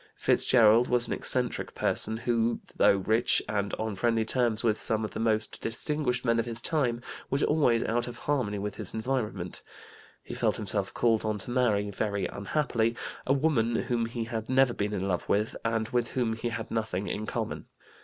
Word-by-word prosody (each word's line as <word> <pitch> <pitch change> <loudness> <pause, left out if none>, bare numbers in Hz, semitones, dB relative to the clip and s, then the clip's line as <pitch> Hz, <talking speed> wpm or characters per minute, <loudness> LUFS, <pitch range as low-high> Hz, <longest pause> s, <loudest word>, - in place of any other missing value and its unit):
Fitzgerald 115 +2 +5
was 125 -1 +2
an - - -2
eccentric 125 -1 +1
person 110 +1 0
who, 115 0 0 0.2
though 100 - +4
rich 110 +5 +3
and 100 -1 -1
on 110 -2 -3
friendly 115 +3 +1
terms 115 -2 +1
with 110 -2 +1
some 110 -1 -1
of - - -6
the - - -6
most 110 -1 0
distinguished 125 +2 -2
men 115 -1 +2
of 115 - -1
his 115 -1 -5
time, 125 -4 0 0.3
was 135 +2 0
always 135 -7 +3
out 120 +2 -1
of 120 -1 -7
harmony 125 -9 -1
with 100 0 -4
his - - -3
environment. 110 -6 -3 0.6
He - - -8
felt - - +1
himself - - +1
called 115 -2 +1
on 110 -1 -1
to 105 +4 -5
marry, 105 -5 +1
very 100 0 -2
unhappily, 115 +1 -1 0.3
a 135 - +4
woman 130 -6 +1
whom 115 -1 0
he 115 0 -4
had 115 -1 -5
never 130 -1 +4
been 105 -1 -2
in 95 -1 -2
love 90 -3 -2
with 105 +2 +1
and 115 -1 0
with 120 -1 0
whom 120 -3 -1
he 115 +1 -3
had 115 -1 -5
nothing 110 -4 -2
in 110 +1 -3
common. - - -4
115 Hz, 190 wpm, -28 LUFS, 110-120 Hz, 0.6 s, Fitzgerald